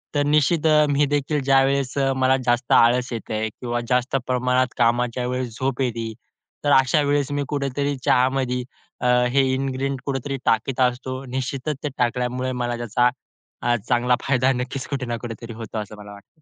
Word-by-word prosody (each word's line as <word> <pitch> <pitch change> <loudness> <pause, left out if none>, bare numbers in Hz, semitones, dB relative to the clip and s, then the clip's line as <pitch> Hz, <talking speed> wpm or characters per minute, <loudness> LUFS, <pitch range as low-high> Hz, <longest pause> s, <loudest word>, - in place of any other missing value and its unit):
तर 145 - +3
निश्चित 150 +2 +2 0.2
मी 145 +1 +3
देखील 145 +1 0
ज्यावेळेस 135 0 +2
अ, 135 -1 +2
मला 130 0 +3
जास्त 120 +1 0
आळस 125 +2 +4
येते 110 -1 -3
किंवा 120 +2 -4
जास्त 125 +2 +1
प्रमाणात 125 0 +2
कामाच्या 120 +1 +1
वेळेस 125 -2 -3
झोप 135 0 -1
येते 115 -3 -2 0.5
तर 145 - +2
अशा 135 +3 +3
वेळेस 145 -1 0
मी 145 0 -1
कुठेतरी 140 0 -1
चहामध्ये 130 0 +2 0.7
हे 140 - +5
इन्ग्रीडिएंट 135 0 -2
कुठेतरी 135 0 -3
टाकीत 120 +4 +1
असतो. 130 +1 0
निश्चितच 130 +3 -3
ते 150 - -1
टाकल्यामुळे 125 +1 -1
मला 120 -1 -2
त्याचा 120 +1 +2 0.8
चांगला 125 0 +3
फायदा 130 -1 +2
नक्कीच 125 +2 -4
कुठे 140 -2 -3
ना 120 -1 -3
कुठेतरी 115 0 -7
होतो 110 -1 -7
असं 105 0 -6
मला 105 0 -11
वाटतं. 100 +10 -16
130 Hz, 155 wpm, -23 LUFS, 120-135 Hz, 0.8 s, हे